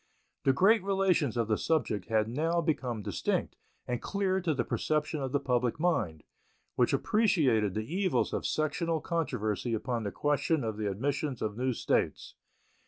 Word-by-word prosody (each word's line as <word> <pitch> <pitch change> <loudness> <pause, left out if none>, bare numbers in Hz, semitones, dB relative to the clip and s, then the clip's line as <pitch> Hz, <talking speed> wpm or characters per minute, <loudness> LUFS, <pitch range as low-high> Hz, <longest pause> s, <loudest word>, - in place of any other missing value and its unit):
The 135 - +6
great 195 - +4
relations 185 - +1
of 115 -2 +1
the 110 -1 +1
subject 110 - 0
had 110 -1 +2
now 160 +8 0
become 125 -9 -1
distinct - - -1 0.3
and 125 -1 -2
clear 190 -2 0
to 165 -4 0
the 125 - 0
perception 150 +3 -1
of 135 -1 -3
the 145 - +2
public 125 -1 0
mind, 110 - 0 0.5
which - - +3
appreciated 135 - +2
the 110 0 -2
evils 190 -1 +1
of - - -1
sectional 160 +2 0
controversy 120 - -1
upon 120 +1 -2
the 100 -2 -3
question 145 - 0
of 110 -2 -3
the 105 -1 -1
admission 140 +7 -1
of 105 -1 -2
new 130 +2 0
States. - - -1
135 Hz, 165 wpm, -30 LUFS, 110-165 Hz, 0.5 s, The